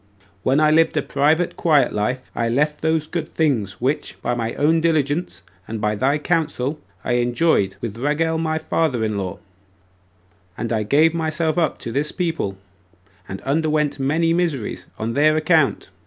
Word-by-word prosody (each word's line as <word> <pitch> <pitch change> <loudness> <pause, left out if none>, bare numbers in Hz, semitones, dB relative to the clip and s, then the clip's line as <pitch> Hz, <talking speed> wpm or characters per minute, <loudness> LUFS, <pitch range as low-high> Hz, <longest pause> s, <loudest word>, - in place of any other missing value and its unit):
When 130 +7 +2
I 155 0 +4
lived 160 +1 +3
a - - +1
private 155 +5 +1
quiet 155 -4 +3
life, 125 +5 -2
I 115 - -1
left 150 +5 0
those 160 -1 +1
good 160 0 -5
things 120 - +1
which, 135 +5 -2
by - - 0
my 115 -1 -3
own 160 +3 +2
diligence, 160 - 0 0.2
and 110 0 -4
by 105 0 0
thy 130 +7 +1
counsel, 150 -2 -1 0.2
I 120 -1 +1
enjoyed 120 - +1
with 115 -2 -5
Raguel 160 +4 0
my 160 -1 0
father 155 -6 0
in 110 -1 -1
law; 95 -2 -4 1.2
and 115 0 -2
I 110 - +1
gave 150 +9 +3
myself 160 0 0
up 160 - 0
to 115 - -5
this 145 +4 0
people, 165 - -2 0.7
and 95 - -6
underwent 150 0 0
many 160 +5 +1
miseries 165 -10 -2
on 115 +1 -3
their 155 +3 +3
account. 155 -2 +2
150 Hz, 165 wpm, -21 LUFS, 120-160 Hz, 1.2 s, I